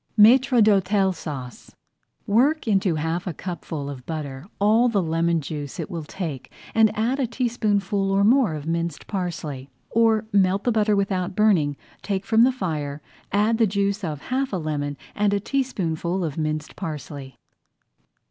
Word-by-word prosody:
MAÎTRE 245 +2 +6
D'HÔTEL 195 -1 +3
SAUCE 135 -7 -8 0.5
Work 260 +8 +2
into 195 -5 +2
half 160 +4 -2
a 170 - -3
cupful 160 -4 -5
of 135 -3 -7
butter 145 -2 -5
all 220 +4 +4
the 215 -3 +1
lemon 165 -1 +1
juice 145 -1 -6
it - - -4
will 165 -3 -5
take 150 -7 -6 0.2
and 220 -1 +5
add 240 +5 0
a 260 - +1
teaspoonful 210 -5 0
or 195 +1 +3
more 225 - +4
of 150 -1 -6
minced 165 -1 -2
parsley. 165 -8 -4 0.2
Or, 225 -1 +3
melt 195 0 +3
the 245 - +2
butter 215 -1 +2
without 190 -2 -1
burning, 170 -10 +3 0.2
take 195 -1 -2
from 225 +2 +4
the 260 - +3
fire, 155 - -3 0.3
add 215 +3 +2
the 225 - +5
juice 200 +1 -1
of 150 -5 -4
half 265 +1 0
a 190 - -1
lemon 145 -3 -3 0.2
and 205 -1 +1
a - - +1
teaspoonful 190 - -1
of 155 -4 -3
minced 155 -1 -3
parsley. 145 -6 -7
190 Hz, 160 wpm, -24 LUFS, 155-215 Hz, 0.5 s, MAÎTRE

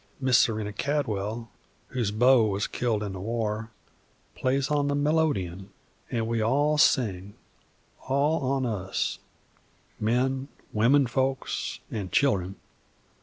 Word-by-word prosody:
Miss 130 -2 +4
Serena 105 -2 +1
Cadwell, 115 -5 -2 0.4
whose 120 -5 -1
beau 120 +3 +5
was 100 0 -1
killed 115 -4 -1
in 100 -2 -4
the 95 - -6
war, 110 +1 -2 0.6
plays 135 +3 0
on 145 -1 +2
the 145 - 0
melodeon, 145 - 0 0.4
and 115 -2 -1
we 115 -1 0
all 145 +7 +2
sing, 105 - +2 0.7
all 140 +4 +2
on 135 -1 0
us, 95 -5 -2 0.8
men, 130 +4 0 0.3
womenfolks, 130 +3 +1
an' 100 -4 -4
children. 95 -9 +1
120 Hz, 115 wpm, -27 LUFS, 105-135 Hz, 0.8 s, beau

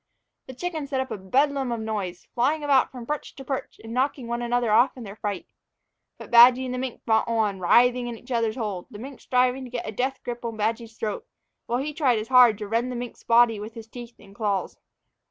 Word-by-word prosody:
The 260 - -9
chickens 315 -2 -4
set 270 -2 -1
up 260 -1 -3
a 220 - -3
bedlam 270 +6 +1
of 235 - -2
noise, 205 -5 -4
flying 290 +6 +1
about 275 -3 +3
from 250 -3 -9
perch 300 +3 -5
to 270 - -10
perch 270 -1 -5
and 225 0 -8
knocking 260 0 0
one 235 +1 -3
another 240 -1 0
off 240 +5 +4
in 245 - -8
their 200 -1 -9
fright. 205 -3 -4 0.7
But - - -11
Badgy 245 +2 +8
and 250 - -4
the 255 - -3
mink 255 -2 -5
fought 220 0 +2
on, 220 -4 0
writhing 245 +6 +4
in 235 -1 -5
each 245 +4 -14
other's 230 -2 0
hold, 210 -7 -4
the 205 - -10
mink 265 +5 -9
striving 250 +1 +1
to 255 - -8
get 245 -1 -5
a - - -3
death 260 +5 -2
grip 240 0 -6
on 230 -2 -4
Badgy's 225 +1 -2
throat, 220 - -4 0.4
while 240 - 0
he 290 +4 -3
tried 270 -6 +2
as 215 +1 -5
hard 250 -4 +7
to 210 -1 -6
rend 230 +4 0
the - - -5
mink's 245 0 -6
body 230 -2 +4
with 215 +3 -8
his 225 -1 -9
teeth 240 0 -10
and 195 - -17
claws. 200 -3 -2
240 Hz, 235 wpm, -25 LUFS, 220-255 Hz, 0.7 s, Badgy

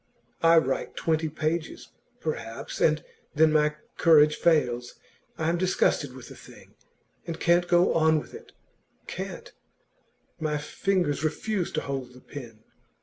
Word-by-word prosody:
I 165 0 +6
write 135 -4 0
twenty 160 -1 0
pages, 155 +2 -3 0.3
perhaps, 115 -7 -5
and 155 -1 +3 0.3
then 155 +1 +5
my 150 0 +2 0.2
courage 150 -2 +6
fails. 125 -7 +1 0.4
I 160 - -1
am 170 +1 +1
disgusted 155 -7 +1
with 130 - -10
the - - -11
thing, - - -16 0.5
and 165 -1 -5
can't 175 +1 +3
go 175 +1 +4
on 160 -1 +4
with 150 - -6
it - - -12 0.5
can't! - - -7 0.9
My 155 -1 -1
fingers 155 0 -1
refuse 175 +4 -1
to - - 0
hold 135 -2 -5
the - - -13
pen. 115 -6 -10
155 Hz, 140 wpm, -27 LUFS, 145-165 Hz, 0.9 s, I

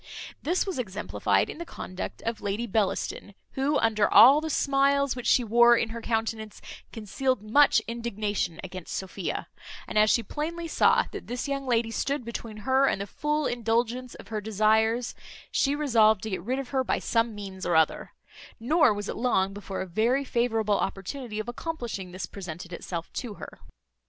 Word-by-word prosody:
This 350 +5 0
was 380 -9 -3
exemplified 210 -3 0
in - - -8
the - - -3
conduct 185 - -7
of 230 -1 -3
Lady 205 +4 -2
Bellaston, 205 -1 -2 0.2
who, 280 +2 +1
under 215 -2 +2
all 270 +6 +8
the 315 - -3
smiles 280 -1 +2
which 245 -1 -5
she 250 - +4
wore 235 +1 +6
in 225 - 0
her 230 +1 -6
countenance, 225 -2 -2 0.3
concealed 225 +2 -2
much 280 +7 +5
indignation 210 -7 -3
against 185 -2 -7
Sophia; 190 -1 -4 0.4
and 215 - +1
as 215 0 +5
she 235 - +3
plainly 330 - -4
saw - - +3
that - - -8
this 245 +3 -3
young 275 -1 -3
lady 230 -2 +1
stood 275 +2 -2
between 230 -2 -6
her 265 +1 +4
and - - 0
the 200 - -3
full 300 +7 -1
indulgence 240 +1 -1
of - - -13
her 215 -1 -3
desires, 220 +3 +2 0.4
she 280 +1 +2
resolved 225 -8 +3
to 220 - -4
get 190 - -2
rid 250 +8 -2
of 270 -2 -5
her 265 -1 +1
by - - 0
some 230 -1 0
means 195 -2 -8
or 175 - +1
other; 160 -1 +1 0.5
nor 295 +3 +4
was 205 0 -5
it - - -4
long 195 -6 +1
before 200 -1 -5
a - - -3
very 230 +9 +1
favourable 225 -4 +1
opportunity 215 +4 -4
of 215 - -3
accomplishing 240 - -5
this 185 0 -5
presented 175 -2 -8
itself 170 -1 -6
to 230 -5 -5
her. - - -10
230 Hz, 180 wpm, -27 LUFS, 205-260 Hz, 0.5 s, all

